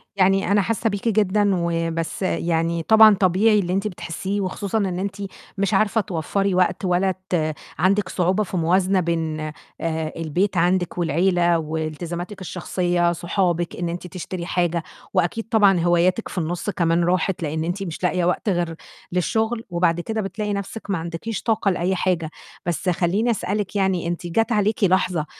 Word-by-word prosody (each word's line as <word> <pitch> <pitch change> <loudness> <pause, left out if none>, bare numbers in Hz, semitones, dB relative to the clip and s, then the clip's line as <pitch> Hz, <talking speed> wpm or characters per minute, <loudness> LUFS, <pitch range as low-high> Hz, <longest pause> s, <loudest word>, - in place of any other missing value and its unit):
يعني 195 0 +3
أنا 205 0 +4
حاسّة 225 +2 0
بيكِ 205 +2 -3
جدًا، 205 -1 +2
وبس 165 0 -2
يعني 165 -2 0
طبعًا 220 0 +7
طبيعي 205 +3 +3
اللي 180 -1 -1
أنتِ 195 +2 0
بتحسّيه 190 +2 -4
وخصوصًا 195 +3 -2
إن 185 -3 -1
أنتِ 195 0 -3 0.4
مش 200 +1 0
عارفة 215 +2 +3
توفّري 195 +1 -1
وقت 185 +1 +1
ولا 185 +1 +2 0.2
ت 155 -3 0 0.3
عندِك 190 +2 +2
صعوبة 185 +3 +1
في 190 - -11
الموازنة 185 +3 +2
بين 165 -2 -1 0.4
آآ، 160 -1 -2
البيت 175 +5 0
عندِك 175 +1 +1
والعيلة 175 +1 +2
وإلتزاماتِك 160 +5 -4
الشخصية، 175 0 0
صحابِك، 175 0 -1
إن 175 -1 -3
أنتِ 175 +1 -5
تشتري 180 0 -6
حاجة 175 -2 0 0.3
وأكيد 215 +6 0
طبعًا 200 -5 +5
هواياتِك 175 +5 +2
في - - -9
النُصّ 175 +4 -2
كمان 170 -3 +1
راحت، 180 0 0
لأن 155 +1 -2
أنتِ 180 +4 -2
مش 170 -1 -6
لاقية 180 0 +1
وقت 180 +4 0
غير 175 -3 -1 0.4
للشغل 220 +5 0
وبعد 170 -1 +1
كده 220 +5 -2
بتلاقي 205 +1 -3
نَفْسِك 200 +2 -5
ما 195 - +1
عندكيش 170 +6 -5
طاقة 220 -3 +1
لأي 180 +2 0
حاجة، 175 -3 0 0.4
بس 175 +2 -1
خلّيني 190 +7 +1
أسألِك 200 0 -2
يعني 190 -4 +1
أنتِ 175 0 -3
جَت 225 +7 +1
عليكِ 210 0 +1
لحظة 180 -4 +2
180 Hz, 160 wpm, -22 LUFS, 170-200 Hz, 0.4 s, طبعًا